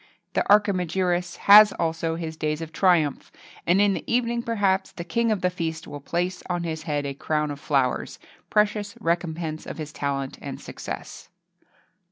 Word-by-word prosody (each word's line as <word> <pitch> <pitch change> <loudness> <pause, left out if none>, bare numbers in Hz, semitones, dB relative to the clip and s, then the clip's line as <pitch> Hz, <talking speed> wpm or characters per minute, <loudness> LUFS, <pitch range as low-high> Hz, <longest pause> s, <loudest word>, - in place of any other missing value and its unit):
The - - +2
Archimagirus 180 -3 +2
has 210 0 +9
also 165 0 -1
his 165 -1 -5
days 155 -1 -2
of 165 -1 -7
triumph; 165 -7 +2 0.4
and 180 +3 +4
in 205 -1 +4
the - - -4
evening, 235 0 +1
perhaps, 200 -5 0
the 170 - -7
king 230 +6 0
of 210 - 0
the 180 - +1
feast 165 -2 -4
will 145 - -7
place 175 +5 -2
on 175 -1 -1
his 160 -2 -3
head 145 -1 -1
a 140 - -3
crown 150 +1 -1
of 145 - -7
flowers, 135 -4 0 0.3
precious 210 -1 +1
recompense 165 -2 -2
of - - -6
his 155 -1 -6
talent 135 -1 -3
and - - -6
success. - - -8
170 Hz, 170 wpm, -25 LUFS, 155-195 Hz, 0.4 s, has